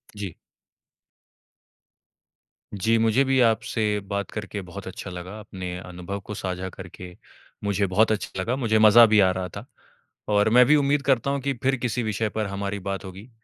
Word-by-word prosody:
जी। 100 -4 -5 2.4
जी, 110 +3 +1
मुझे 115 +4 +3
भी 135 -1 +2
आपसे 110 -2 +1
बात 100 -1 -3
करके 105 -1 -5
बहुत 95 +1 -9
अच्छा 95 +1 -7
लगा, 90 +3 -8
अपने 90 -3 -6
अनुभव 90 +2 -7
को 100 +2 -8
साझा 95 -1 -4
करके 90 -1 -11 0.5
मुझे 100 -1 +1
बहुत 105 +4 +3
अच्छा 105 -2 -3
लगा, 115 +7 -1
मुझे 115 -5 +1
मज़ा 110 +2 +8
भी 110 -1 +4
आ 95 -2 +5
रहा 90 0 -3
था। 100 - -8 0.6
और 105 +1 +3
मैं 125 +3 +6
भी 150 +5 +5
उम्मीद 145 0 +2
करता 135 0 +2
हूँ 140 0 -2
कि 140 +1 -1
फिर 135 +1 +3
किसी 120 0 -2
विषय 110 0 -1
पर 110 0 -2
हमारी 100 +1 -4
बात 95 0 -4
होगी, 95 +5 -10
105 Hz, 175 wpm, -24 LUFS, 95-115 Hz, 2.4 s, मज़ा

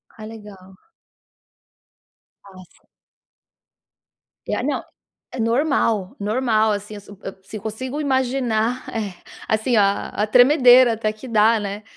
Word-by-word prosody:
Ah, 215 - -10
legal. 205 -4 -12 1.7
Ah, 200 - -16 0.2
sim. - - -29 1.6
E - - -2
no - - -2 0.5
é - - -6
normal, 230 -5 0
normal 220 0 +1
assim, 205 +1 -5
se 200 - -19
eu 205 - -12 0.3
se 215 - -8
eu 205 - -11
consigo 255 +6 -5
imaginar 255 -3 -1
é 210 -4 -4 0.3
assim, 220 +3 0
a 200 -2 +2
a 210 - -2
tremedeira 250 0 +6
até 215 -1 -2
que 215 +5 -12
dá, 225 0 +3
né, 205 0 -6
220 Hz, 125 wpm, -21 LUFS, 210-250 Hz, 1.7 s, tremedeira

